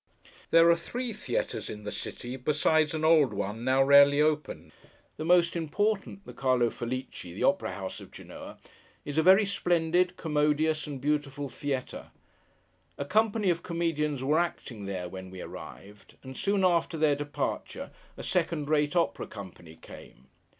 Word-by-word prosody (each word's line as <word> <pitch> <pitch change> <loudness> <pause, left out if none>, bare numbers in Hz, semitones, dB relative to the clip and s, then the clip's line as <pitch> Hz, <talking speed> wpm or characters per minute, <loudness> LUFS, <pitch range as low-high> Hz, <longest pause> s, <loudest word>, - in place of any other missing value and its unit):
There 165 0 +6
are - - +5
three 240 +8 -5
theatres 145 - -3
in 105 0 -7
the 105 - -5
city, 120 +1 -6
besides 150 +3 +1
an 155 0 -1
old 150 -9 +4
one 105 +3 -4
now 130 +1 +3
rarely 140 +1 +6
opened. 150 -2 0 0.5
The 155 - -4
most 175 0 +4
important—the 200 +4 -2
Carlo 130 -3 +1
Felice: 130 +2 -5
the 90 +1 -6
opera 190 - +1
house 95 -2 -6
of - - -12
Genoa—is 145 +2 -9
a - - +5
very 190 +5 +6
splendid, 180 -1 +1
commodious, 150 0 +1
and 140 -3 -6
beautiful 145 0 -2
theatre. 135 -2 -4 0.9
A 140 - -3
company 215 +1 +2
of 170 - -2
comedians 150 -5 -1
were 150 +4 +2
acting 120 - -3
there, 95 -2 -4
when 95 +1 -8
we 95 0 -10
arrived: 100 +3 -11
and 130 0 -9
soon 200 +3 +1
after 170 -2 +1
their 155 -2 +3
departure, 145 0 -4 0.3
a - - -7
second 165 -4 -1
rate 150 +1 +1
opera 170 - 0
company 85 -4 -11
came. 65 -4 -14
150 Hz, 150 wpm, -28 LUFS, 130-170 Hz, 0.9 s, There